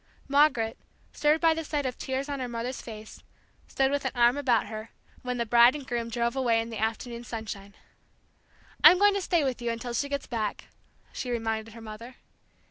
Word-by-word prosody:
Margaret, 275 -6 +3 0.3
stirred 300 +1 +2
by 330 -1 +5
the 325 0 -4
sight 295 -2 -2
of 250 -2 -2
tears 265 +1 -3
on 285 -1 -4
her 255 - -3
mother's 240 +2 -4
face, 215 -2 -10 0.5
stood 270 0 +1
with 285 0 -1
an - - -1
arm 240 +1 +4
about 255 -6 +2
her, 215 +1 -7 0.3
when 250 -1 -3
the 235 - -1
bride 235 +3 +6
and 285 -3 -6
groom 235 -2 -3
drove 235 +1 -1
away 240 -4 +2
in 225 +1 -4
the 225 - -5
afternoon 235 +2 -3
sunshine. 215 -4 -7 1.1
"I'm 360 - +10
going 410 +1 +5
to 400 - -1
stay 345 -4 +1
with 260 -3 -2
you 240 - -1
until 235 +1 -4
she 280 +4 -1
gets 280 -1 -3
back!" 220 -4 -4 0.4
she 255 - -5
reminded 225 -1 -3
her 230 - -10
mother. 225 +3 -9
240 Hz, 200 wpm, -28 LUFS, 225-275 Hz, 1.1 s, I'm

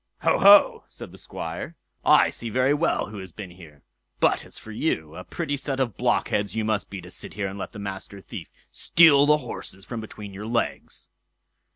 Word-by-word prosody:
"Ho! - - +3
ho!" - - +7
said - - -10
the - - -13
Squire; 85 - -6 0.3
"I - - +5
see 115 - -4
very 130 +5 +2
well 150 -7 0
who 105 - -7
has 95 -2 -9
been 95 0 -9
here; 80 -5 -15 0.4
but - - +2
as - - -8
for 110 - -10
you, 80 - -2
a 90 - -7
pretty 155 - -3
set 135 -1 -2
of 120 -7 0
blockheads 100 -1 0
you 110 -1 -1
must 110 -2 -1
be 100 -2 -7
to 90 +1 -11
sit - - -6
here 100 -1 -2
and 95 +1 -7
let - - -5
the - - -11
Master 100 0 -6
Thief 90 -3 -9 0.2
steal 145 -4 +6
the 150 0 +6
horses 95 -4 -7
from 115 -2 -5
between 105 -2 -9
your 105 +2 -7
legs." 120 +1 -2
105 Hz, 205 wpm, -25 LUFS, 95-130 Hz, 0.4 s, ho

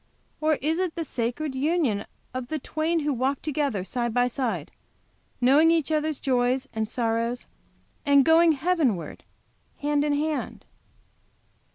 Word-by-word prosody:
or 310 0 +2
is 320 +3 +1
it 365 -3 -1
the 335 - -2
sacred 265 +2 -3
union 270 -7 0 0.3
of 255 -1 -4
the 310 - -2
twain 315 +3 -1
who 295 -1 0
'walk 265 +2 0
together 285 -10 -1
side 240 +4 -2
by 245 0 +3
side, 225 - -3 0.7
knowing 280 +6 +5
each 325 -2 +2
other's 310 -1 0
joys 255 0 +1
and 220 -1 -2
sorrows, 230 +1 -1 0.6
and 280 -2 +5
going 325 0 +6
Heavenward 290 - -1 0.5
hand 290 0 +1
in 295 -1 +1
hand? 300 +1 -2
280 Hz, 140 wpm, -26 LUFS, 245-310 Hz, 0.7 s, going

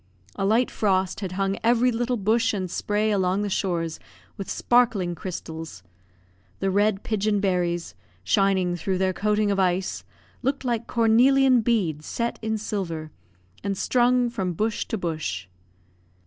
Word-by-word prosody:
A 195 - 0
slight 230 +4 +2
frost 190 -3 0
had 190 -3 -4
hung 195 +1 -1
every 240 +2 +4
little 240 +1 -1
bush 225 +2 +1
and 185 -3 -3
spray 210 +1 0
along 190 0 +1
the 205 - -3
shores 170 -4 -1 0.4
with 195 - -6
sparkling 230 -8 +2
crystals. 160 - -7 0.8
The 195 0 0
red 205 0 +2
pigeon 210 -1 0
berries, 175 -3 -1 0.3
shining 185 - +2
through 185 +2 -2
their 190 0 +1
coating 210 +2 +1
of 195 - 0
ice, 185 0 0 0.4
looked 270 +1 -1
like 235 -2 -1
cornelian 250 +3 +4
beads 185 -10 0
set 235 0 -2
in 220 0 -1
silver, 170 -7 -4 0.5
and 200 -1 -2
strung 245 +1 +2
from 190 -6 -2
bush 215 +5 -1
to 225 - -2
bush. 155 - -3
200 Hz, 145 wpm, -25 LUFS, 180-225 Hz, 0.8 s, every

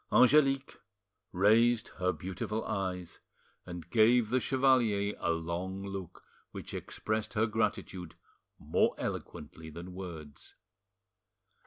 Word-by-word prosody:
Angelique 135 +1 +4 0.5
raised 110 +5 +4
her 90 0 +2
beautiful 95 +5 -4
eyes, 95 -4 -3 0.5
and 85 -2 -7
gave 115 0 +4
the 130 - +3
chevalier 120 -6 +2
a - - -1
long 85 +4 -2
look 95 -3 -7 0.3
which - - -8
expressed 110 +1 -3
her 110 +1 +3
gratitude 105 -5 -2 0.4
more - - +1
eloquently 80 0 -6
than 85 +3 -8
words. 80 -6 -9
100 Hz, 105 wpm, -31 LUFS, 90-115 Hz, 0.5 s, Angelique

